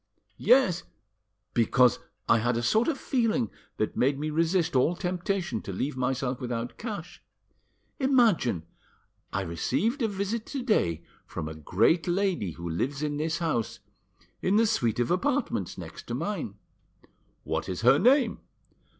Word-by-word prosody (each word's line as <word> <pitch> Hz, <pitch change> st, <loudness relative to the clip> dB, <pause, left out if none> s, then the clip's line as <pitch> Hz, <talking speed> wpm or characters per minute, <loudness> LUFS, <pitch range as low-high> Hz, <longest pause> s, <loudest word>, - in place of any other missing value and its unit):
"Yes, 210 Hz, -7 st, +4 dB, 0.7 s
because 120 Hz, +1 st, +4 dB, 0.3 s
I 115 Hz, -, +5 dB
had 120 Hz, +1 st, +1 dB
a 120 Hz, -, -1 dB
sort 220 Hz, -, +3 dB
of 320 Hz, -4 st, 0 dB
feeling 240 Hz, -2 st, 0 dB, 0.3 s
that 110 Hz, -, -1 dB
made 135 Hz, +2 st, +2 dB
me 155 Hz, +2 st, -2 dB
resist 165 Hz, +1 st, +1 dB
all 140 Hz, +7 st, +3 dB
temptation 180 Hz, -, -2 dB
to -, -, -6 dB
leave 130 Hz, +9 st, -2 dB
myself 130 Hz, 0 st, -1 dB
without 120 Hz, -1 st, -4 dB
cash. 200 Hz, -7 st, -6 dB, 0.8 s
Imagine! 230 Hz, -, +3 dB, 0.7 s
I -, -, -1 dB
received 190 Hz, -, -1 dB
a 225 Hz, -, +3 dB
visit 205 Hz, +2 st, -3 dB
to 275 Hz, -3 st, -4 dB
day 85 Hz, -, +1 dB, 0.2 s
from 75 Hz, -, -5 dB
a 80 Hz, -, -5 dB
great 105 Hz, -, +2 dB
lady 175 Hz, -, 0 dB
who 85 Hz, +1 st, -7 dB
lives 135 Hz, -, -2 dB
in 145 Hz, -1 st, -1 dB
this 160 Hz, +2 st, -1 dB
house—in 165 Hz, -, -4 dB
the 225 Hz, +2 st, +5 dB
suite 120 Hz, -, +1 dB
of 120 Hz, -, +1 dB
apartments 190 Hz, +10 st, 0 dB
next -, -, -9 dB
to -, -, -3 dB
mine." -, -, -3 dB, 0.9 s
"What -, -, -2 dB
is -, -, -3 dB
her -, -, +6 dB
name?" 255 Hz, -2 st, +4 dB
160 Hz, 145 wpm, -28 LUFS, -, 0.9 s, her